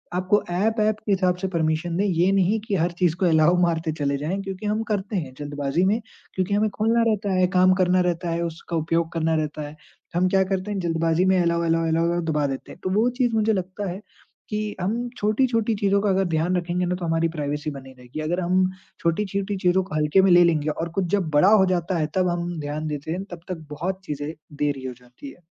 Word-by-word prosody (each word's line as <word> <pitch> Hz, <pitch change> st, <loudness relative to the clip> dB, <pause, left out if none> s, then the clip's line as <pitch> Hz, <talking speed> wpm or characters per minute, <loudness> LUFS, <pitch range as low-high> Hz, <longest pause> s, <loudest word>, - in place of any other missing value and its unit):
आपको 185 Hz, +3 st, +2 dB
app 215 Hz, +6 st, +1 dB
app 215 Hz, 0 st, +2 dB
के 205 Hz, -, 0 dB
हिसाब 185 Hz, -2 st, +2 dB
से 190 Hz, +1 st, -2 dB
परमिशन 165 Hz, 0 st, -1 dB
दें, 200 Hz, -, +1 dB
ये 180 Hz, 0 st, +2 dB
नहीं 195 Hz, +3 st, +2 dB
कि 210 Hz, -2 st, -2 dB
हर 175 Hz, 0 st, +1 dB
चीज़ 175 Hz, -3 st, +2 dB
को 190 Hz, -, +1 dB
अलाउ 160 Hz, +1 st, +4 dB
मारते 165 Hz, -2 st, +1 dB
चले 140 Hz, -1 st, 0 dB
जाएँ। 160 Hz, +7 st, -2 dB
क्योंकि 195 Hz, +1 st, -6 dB
हम 215 Hz, +2 st, 0 dB
करते 205 Hz, 0 st, -2 dB
हैं 135 Hz, -7 st, -4 dB
जल्दबाज़ी 145 Hz, +3 st, -1 dB
में 215 Hz, +4 st, +2 dB, 0.3 s
क्योंकि 185 Hz, +1 st, -1 dB
हमें 215 Hz, +1 st, +2 dB
खोलना 225 Hz, +3 st, +1 dB
रहता 205 Hz, -2 st, 0 dB
है, 185 Hz, -1 st, +3 dB
काम 185 Hz, 0 st, +6 dB
करना 185 Hz, 0 st, +3 dB
रहता 175 Hz, 0 st, -1 dB
है, 170 Hz, -, -1 dB
उसका 170 Hz, +1 st, -5 dB
उपयोग 165 Hz, +1 st, 0 dB
करना 160 Hz, -1 st, +1 dB
रहता 155 Hz, -1 st, -2 dB
है। 150 Hz, -, -11 dB, 0.4 s
हम 180 Hz, +1 st, +3 dB
क्या 190 Hz, 0 st, +3 dB
करते 190 Hz, +2 st, -2 dB
हैं 200 Hz, -, -2 dB
जल्दबाज़ी 165 Hz, 0 st, +1 dB
में 190 Hz, -1 st, +3 dB
अलाउ, 170 Hz, 0 st, +1 dB
अलाउ, 165 Hz, 0 st, +1 dB
अलाउ 170 Hz, +2 st, +1 dB
दबा 150 Hz, -1 st, +1 dB
देते 135 Hz, -1 st, -6 dB
हैं। -, -, -13 dB
तो -, -, -1 dB
वो 240 Hz, +2 st, +3 dB
चीज़ 240 Hz, -2 st, +2 dB
मुझे 220 Hz, 0 st, +2 dB
लगता 190 Hz, +1 st, -3 dB
है 190 Hz, +3 st, -7 dB, 0.5 s
कि 210 Hz, -1 st, -3 dB
हम 230 Hz, +6 st, -1 dB
छोटी-छोटी 225 Hz, +1 st, +1 dB
चीज़ों 200 Hz, -1 st, +2 dB
का 205 Hz, -, +1 dB
अगर 190 Hz, 0 st, +2 dB
ध्यान 175 Hz, +3 st, +1 dB
रखेंगे 175 Hz, +1 st, -1 dB
ना 180 Hz, +1 st, -1 dB
तो 180 Hz, -1 st, -5 dB
हमारी 165 Hz, 0 st, +1 dB
प्राइवेसी 150 Hz, +1 st, -2 dB
बनी 135 Hz, -1 st, -10 dB
रहेगी। 125 Hz, +5 st, -8 dB
अगर 170 Hz, +4 st, -1 dB
हम 185 Hz, +1 st, +2 dB, 0.3 s
छोटी-छोटी 195 Hz, +3 st, -1 dB
चीज़ों 185 Hz, +1 st, +2 dB
को 155 Hz, -5 st, -7 dB
हल्के 150 Hz, +5 st, +3 dB
में 190 Hz, -, +4 dB
ले 175 Hz, 0 st, +7 dB
लेंगे 155 Hz, -3 st, +2 dB
और 165 Hz, +2 st, -3 dB
कुछ 185 Hz, -, +1 dB
जब 185 Hz, -6 st, -1 dB
बड़ा 180 Hz, +7 st, +6 dB
हो 210 Hz, -3 st, +6 dB
जाता 175 Hz, +1 st, -1 dB
है 155 Hz, -, 0 dB
तब 185 Hz, -1 st, +2 dB
हम 175 Hz, 0 st, -3 dB
ध्यान 150 Hz, +1 st, -4 dB
देते 150 Hz, +1 st, -4 dB
हैं 185 Hz, +3 st, -3 dB
तब 175 Hz, -, -7 dB
तक 165 Hz, -4 st, -5 dB
बहुत 185 Hz, +6 st, -3 dB
चीज़ें 145 Hz, 0 st, -4 dB, 0.3 s
देरी 140 Hz, -3 st, -1 dB
हो 125 Hz, -, -5 dB
जाती 125 Hz, -, -12 dB
है। -, -, -19 dB
180 Hz, 235 wpm, -24 LUFS, 160-195 Hz, 0.5 s, ले